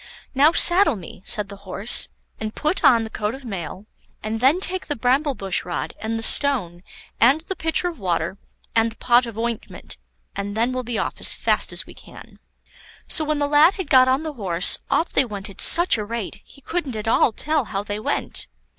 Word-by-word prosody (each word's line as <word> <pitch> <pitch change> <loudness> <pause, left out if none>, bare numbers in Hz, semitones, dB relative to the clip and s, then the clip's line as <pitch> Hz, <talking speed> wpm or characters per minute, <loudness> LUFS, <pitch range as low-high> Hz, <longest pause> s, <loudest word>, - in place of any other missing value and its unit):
"Now 285 +4 +4
saddle 350 - +5
me," 180 -2 -11
said 210 -1 +3
the 200 - -10
Horse, 200 +3 0 0.3
"and 215 0 -6
put 310 +5 -1
on 230 -3 +5
the 220 - -7
coat 210 +3 -3
of 265 -1 -13
mail, 195 -2 -7 0.4
and 220 +1 -3
then 270 +9 +3
take 375 0 -1
the 295 - -3
bramble 265 +4 0
bush 195 -4 -2
rod, 175 - -5
and 220 +1 -3
the 225 - -5
stone, 220 -12 +4 0.4
and 270 +7 +4
the 380 +3 -6
pitcher 325 +2 0
of 340 -6 -6
water, 175 0 -2 0.4
and 225 0 +2
the - - -13
pot 245 +1 +2
of 225 -2 -9
ointment, 230 -1 -5 0.4
and 205 +1 -5
then 235 +3 +1
we'll 255 0 -3
be 240 -2 -5
off - - -4
as - - +3
fast - - +1
as - - -3
we - - -14
can." - - -15 0.7
So 315 - +2
when 305 0 -1
the 290 0 -1
lad 300 +5 +4
had 375 -7 -7
got 255 -1 +6
on 260 +4 +1
the 310 -1 -5
horse, 185 -8 +1
off 285 +5 0
they - - +3
went 205 -4 -5
at 190 - -3
such 340 -8 +6
a - - -3
rate, 225 -1 -6
he 280 - -19
couldn't 295 -4 -4
at 215 0 -6
all 225 - +3
tell 300 +4 -1
how 200 -1 -4
they 205 0 -5
went. 215 - -2
235 Hz, 215 wpm, -21 LUFS, 210-290 Hz, 0.7 s, got